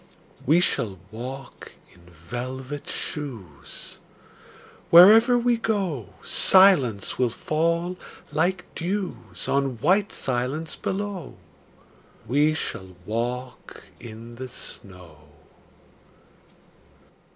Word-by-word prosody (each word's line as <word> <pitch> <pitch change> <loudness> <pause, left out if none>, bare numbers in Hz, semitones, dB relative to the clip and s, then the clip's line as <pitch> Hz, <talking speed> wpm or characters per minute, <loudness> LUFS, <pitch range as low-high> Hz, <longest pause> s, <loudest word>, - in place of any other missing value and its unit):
We 160 +5 +5
shall 105 - +1
walk 125 +3 -8 0.2
in 85 0 -20
velvet 130 - -6
shoes: 115 - -5 0.9
Wherever 220 +8 +8
we 240 0 +2
go 190 - -2
Silence 145 - +4
will 125 -2 +3
fall 170 +7 -1 0.3
like 175 +5 0
dews 185 +2 -4
On 135 -3 0
white 190 - +2
silence 130 +5 -2
below. 200 -2 -4 0.9
We 145 +6 +3
shall 95 - -5
walk 120 +4 -4 0.2
in 115 +1 -10
the 130 +1 -6
snow. 90 -9 -8
135 Hz, 85 wpm, -24 LUFS, 115-180 Hz, 0.9 s, Wherever